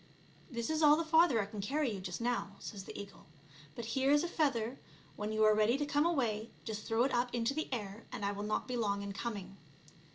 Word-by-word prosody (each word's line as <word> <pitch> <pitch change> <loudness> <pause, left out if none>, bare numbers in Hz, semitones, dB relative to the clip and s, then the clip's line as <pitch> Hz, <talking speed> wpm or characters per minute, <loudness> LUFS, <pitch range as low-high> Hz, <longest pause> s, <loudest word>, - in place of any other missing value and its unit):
" - - -27
This 235 +2 -3
is 315 0 0
all 300 -1 +8
the 330 - -1
farther 320 -6 +5
I 205 - +1
can 205 0 -6
cany 270 +3 0
you 195 - -4
just 180 +2 -5
now," 235 -4 -1
says 195 -3 -7
the - - -8
eagle; 200 -1 -10 0.2
" 145 +1 -21
but 235 - -5
here 270 0 +2
is 295 +2 +5
a - - 0
feather, 270 -7 0 0.4
when 210 +1 -3
you 215 0 +2
are 215 0 +7
ready 215 +4 +3
to 290 - -1
come 290 +2 +2
away 230 -9 0 0.2
just 215 -1 -5
throw 225 +1 +3
it 270 - +1
up 245 +1 +2
into 235 +2 +1
the 310 +2 -2
air, 210 -3 -4
and 205 - -4
I 200 - +1
will 205 0 -5
not 210 +1 -1
be 250 - -2
long 200 -4 0
in 200 0 -5
coming." 200 -3 -5
230 Hz, 255 wpm, -34 LUFS, 205-275 Hz, 0.4 s, all